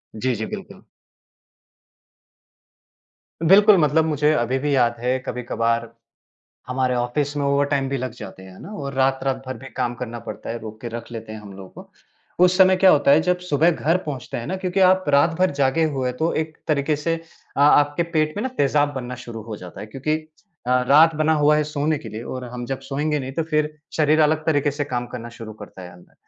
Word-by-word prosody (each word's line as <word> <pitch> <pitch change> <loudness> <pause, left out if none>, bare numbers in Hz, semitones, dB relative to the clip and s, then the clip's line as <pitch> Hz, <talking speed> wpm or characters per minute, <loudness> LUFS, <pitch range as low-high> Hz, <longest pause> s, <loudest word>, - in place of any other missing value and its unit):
जी, 125 +2 -1
जी। 110 +1 -3
बिल्कुल। - - -12 2.6
बिल्कुल, 200 +3 +7
मतलब 155 0 +3
मुझे 150 -1 +2
अभी 125 -1 0
भी 145 0 0
याद 120 -2 +2
है 125 +2 0
कभी-कभार 115 -2 -2 0.8
हमारे 130 0 0
ऑफ़िस 140 +4 -1
में 140 - -1
ओवर 140 0 +2
टाइम 140 -2 0
भी 135 - -1
लग 130 -2 -4
जाते 95 -5 -10
हैं, 95 - -12
है - - -14
ना? - - -9
और 140 -7 -5
रात-रात 135 0 0
भर 130 - -5
भी 135 - -10
काम 120 -2 -1
करना 120 -1 -6
पड़ता - - -7
है, 115 - -4
रोक 110 -1 -10
के 120 - -5
रख 120 +1 -7
लेते 110 -1 -7
हैं 110 - -8
हम 100 -2 -11
लोगों 95 -1 -11
को। - - -24 0.5
उस 180 0 +3
समय 185 0 +6
क्या 185 0 +6
होता 145 -2 +4
है, 150 +3 +6
जब 180 +1 +1
सुबह 165 -1 +2
घर 165 +1 +1
पहुँचते 140 -5 -5
हैं 115 - -5
ना, 190 - -2
क्योंकि 185 +1 -2
आप 185 0 +2
रात 145 +4 +4
भर 185 0 +3
जागे 135 +4 +3
हुए 125 -1 -1
तो 160 +6 -1
एक 155 0 -18
तरीके 150 0 +1
से 165 +3 -1 0.4
अ, - - 0
आपके 145 +2 +4
पेट 155 +3 +1
में 210 - -2
ना 260 - -1
तेज़ाब 145 +1 +2
बनना 125 -1 -5
शुरू 115 -2 -7
हो 110 -1 -7
जाता 90 -2 -10
है, 105 - -7
क्योंकि 135 +7 -2 0.5
अ, 125 0 +3
रात 160 +3 +6
बना 155 +1 +2
हुआ 150 0 +4
है 150 - +1
सोने 150 0 -1
के 115 - -9
लिए 110 +2 -7
और 130 +1 -6
हम 120 0 -5
जब 135 -1 -4
सोयेंगे 150 +2 -2
नहीं 135 0 -5
तो 165 - -1
फिर 150 0 0 0.2
शरीर 155 0 +3
अलग 155 +1 +2
तरीके 145 -2 +2
से 145 +1 -3
काम 125 -3 -3
करना 120 -1 -7
शुरू 110 -1 -8
करता 105 -3 -12
है 90 - -10
अंदर। 90 0 -19
140 Hz, 220 wpm, -22 LUFS, 120-155 Hz, 2.6 s, बिल्कुल